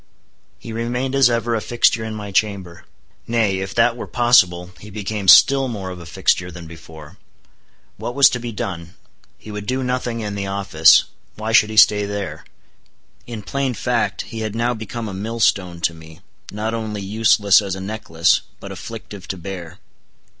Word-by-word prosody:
He 115 - -9
remained 125 +3 -2
as 135 -2 +5
ever, 120 0 -1
a 110 - 0
fixture 115 -1 +2
in 110 -1 -5
my 105 -1 -7
chamber. 95 -4 -2 0.4
Nay—if 95 -5 -1
that 115 0 +3
were 120 - -7
possible—he 95 -6 +2
became 105 -1 -5
still 135 +7 +7
more 100 -6 -5
of 90 - -8
a 85 - -11
fixture 90 +1 0
than 85 -1 -10
before. 80 -2 -13 0.8
What 120 - -5
was 140 -2 +7
to 125 - -2
be 120 0 -5
done? 85 -5 -6 0.4
He 110 - -11
would 105 0 -7
do 130 +2 -1
nothing 125 -2 -2
in 105 -1 -4
the 100 -1 -4
office: 95 -5 +4 0.3
why 110 +1 -4
should 110 -1 +5
he 110 - -6
stay 105 -1 +6
there? 100 -6 -5 0.8
In 115 -3 -7
plain 135 +3 -2
fact, 120 -1 -1
he 115 - -8
had 110 -1 -4
now 120 +1 0
become 110 +1 -6
a 100 - -6
millstone 95 -4 -1
to 85 - +1
me, 80 +1 -14 0.3
not 110 +2 -3
only 110 -2 -4
useless 105 0 +4
as 100 -2 -4
a - - -7
necklace, 95 -5 0 0.2
but - - -9
afflictive 105 -4 -9
to 95 - -4
bear. 90 -2 -8
105 Hz, 175 wpm, -20 LUFS, 95-115 Hz, 0.8 s, still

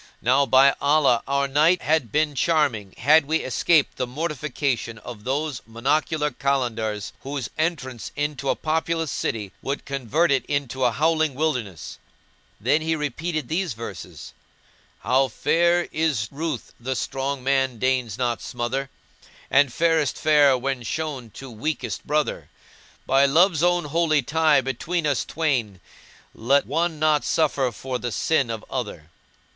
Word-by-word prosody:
Now 135 +3 +3
by 135 +3 +6
Allah, 140 -5 +3
our 140 0 +1
night 155 +6 +3
had 150 -8 +1
been 150 +2 +1
charming 140 - 0
had 150 +5 +5
we 160 +3 0
escaped 145 +4 +2
the 125 - -2
mortification 140 -4 -3
of 105 -1 -10
those 140 +1 -2
monocular 150 +5 0
Kalandars 115 -7 -1
whose 140 -2 -5
entrance 130 -7 -3
into 145 -2 -2
a - - +2
populous 160 0 -1
city 105 -4 -3
would 140 +1 -4
convert 140 +4 0
it 135 -3 +2
into 130 -3 -1
a 120 - +3
howling 155 +2 +1
wilderness." 125 - -3 0.6
Then 150 - +2
he 160 +1 0
repeated 155 0 -3
these 170 0 -1
verses: 115 +1 -9 0.7
"How 130 +1 +2
fair 170 +8 +2
is 150 -9 0
ruth 150 -2 -4
the 130 +2 -3
strong 135 +2 -3
man 135 -2 +1
deigns 125 -3 0
not 120 -2 -1
smother! 125 +3 -3 0.3
* - - -25
And 140 -1 +4
fairest 165 0 +1
fair 145 -3 +4
when 135 0 -2
shown 130 0 -4
to 135 -2 -9
weakest 120 -1 -4
brother: 150 0 -1 0.6
By 135 +1 +4
Love's 165 +3 +4
own 175 -1 +2
holy 155 -1 +1
tie 155 +1 +3
between 155 +7 -2
us 145 -3 +1
twain, 125 - -1 0.3
* - - -27
Let 135 +5 +2
one 165 +3 -1
not 155 -1 +2
suffer 140 -5 +1
for 125 +3 -5
the 120 -1 -3
sin 135 0 +1
of 110 -2 -5
other." 100 - -5
140 Hz, 145 wpm, -23 LUFS, 125-155 Hz, 0.7 s, by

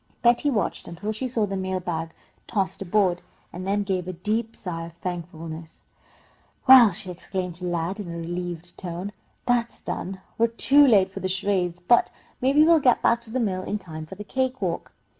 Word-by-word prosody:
Betty 240 +4 +4
watched 225 -7 -1
until 180 +5 -4
she 220 +4 -3
saw 230 -4 +1
the 195 -1 -4
mail 190 -1 -2
bag 165 -2 -3 0.4
tossed 195 -3 -1
aboard, 185 -2 +2 0.3
and 185 +2 -6
then 205 +1 +1
gave 185 -3 -2
a 185 - -3
deep 220 +6 -2
sigh 165 -4 -5
of 170 - -13
thankfulness. 165 -2 -7 0.8
"Well," 255 -5 +9
she 185 0 -6
exclaimed 180 0 -4
to 180 - -2
Lad, 175 +3 -2
in 185 -5 -5
a 170 - -5
relieved 175 0 -5
tone, 180 +2 -5 0.3
"that's 240 -1 +1
done! 190 +1 -5 0.2
We're 230 - +5
too 275 +5 +5
late 195 -6 +5
for - - -6
the 185 - -2
charades, 185 -2 0
but 205 +7 +4 0.3
maybe 275 +4 +5
we'll 330 0 +6
get 255 -4 +3
back 235 0 +3
to 235 - -12
the 255 +3 -1
mill 190 -6 0
in 205 +3 -2
time 160 -5 -8
for 190 - -9
the 210 - -7
cake 260 +4 -1
walk." 180 -4 -3
190 Hz, 195 wpm, -25 LUFS, 175-230 Hz, 0.8 s, Well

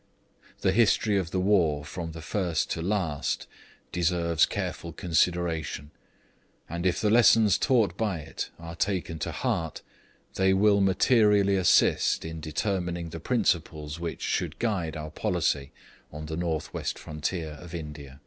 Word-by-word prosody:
The 95 - +3
history 110 0 +3
of 90 -3 -3
the 95 - -1
war 85 -7 +2
from 80 +2 -5
first 80 +1 -2
to 85 - -2
last 85 -7 -1 0.5
deserves 85 -2 +2
careful 85 - -4
consideration; 80 -3 0 0.8
and 85 +2 -2
if 90 - +1
the 105 - +2
lessons 110 -3 +6
taught 110 - +2
by 105 -5 0
it 75 - -6
are 85 0 -8
taken 90 -3 -2
to - - -3
heart, 80 -2 -2 0.5
they 95 0 +3
will 100 +1 +4
materially 100 0 +4
assist 95 -3 +3
in 80 -1 -6
determining 85 +1 -2
the 80 - -7
principles 80 -7 -1
which, 85 -1 -5
should - - -1
guide 90 -9 -1
our 75 0 -6
policy 70 -2 -1 0.4
on 75 +1 -7
the 80 +1 -4
North 80 -2 -2
West - - -3
frontier 80 +2 -4
of 85 -1 -9
India. 75 -4 -8
85 Hz, 140 wpm, -27 LUFS, 80-95 Hz, 0.8 s, lessons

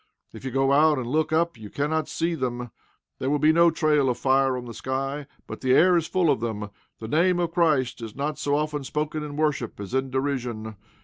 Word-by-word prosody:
If - - -11
you 135 - -3
go 135 +1 +1
out 150 +1 +5
and 130 - -3
look 155 +6 0
up 165 -4 +1
you 105 -2 -9
cannot 155 +5 -1
see 170 +1 -1
them. 125 -5 -3 0.5
There 130 - -1
will 150 - +2
be 155 +2 +4
no 170 +1 +6
trail 150 -4 +2
of 125 - -1
fire 135 -1 +2
on 125 - -6
the 120 - -8
sky. 135 +4 -3 0.2
But - - -8
the 130 -1 +2
air 180 +4 +5
is 165 -2 +1
full 180 -5 +2
of - - 0
them. 105 -3 -4 0.3
The 110 - -7
name 175 +8 +2
of 170 -1 0
Christ 150 -9 +1
is 110 -2 -7
not 145 +2 -3
so 145 0 0
often 150 -1 -1
spoken 150 +2 -3
in 150 -1 -6
worship 150 -8 -1
as 100 +3 -7
in 130 0 0
derision. 125 -5 -3
140 Hz, 230 wpm, -25 LUFS, 125-155 Hz, 0.5 s, no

